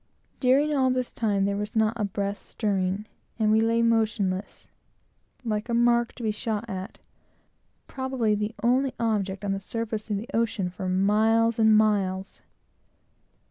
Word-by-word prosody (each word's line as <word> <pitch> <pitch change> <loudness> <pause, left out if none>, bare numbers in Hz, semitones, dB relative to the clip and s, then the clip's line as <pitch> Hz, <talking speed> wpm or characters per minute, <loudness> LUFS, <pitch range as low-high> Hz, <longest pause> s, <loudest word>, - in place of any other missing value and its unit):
During 280 +4 +3
all 265 -2 +3
which 255 -1 -1
time 205 -4 +1
there 200 0 0
was 210 +3 -4
not 220 0 +3
a 225 - -2
breath 200 0 -3
stirring, 195 -1 -2 0.3
and 215 -2 +2
we 220 +1 +4
lay 230 +1 +2
motionless, 215 -4 0 0.8
like 215 +1 -2
a 235 - +1
mark 235 0 +3
to 245 - -9
be 220 - +1
shot 215 +1 -3
at, 190 -3 -6 0.9
probably 260 -5 -1
the 210 +2 -2
only 255 +2 +2
object 205 -4 -1
on 200 - 0
the 195 - -1
surface 220 +1 -4
of 205 - 0
the 215 +4 -6
ocean 215 -5 0
for 185 0 -4
miles 220 +4 +2
and 220 -1 +6
miles. 195 -3 0
215 Hz, 155 wpm, -26 LUFS, 200-230 Hz, 0.9 s, and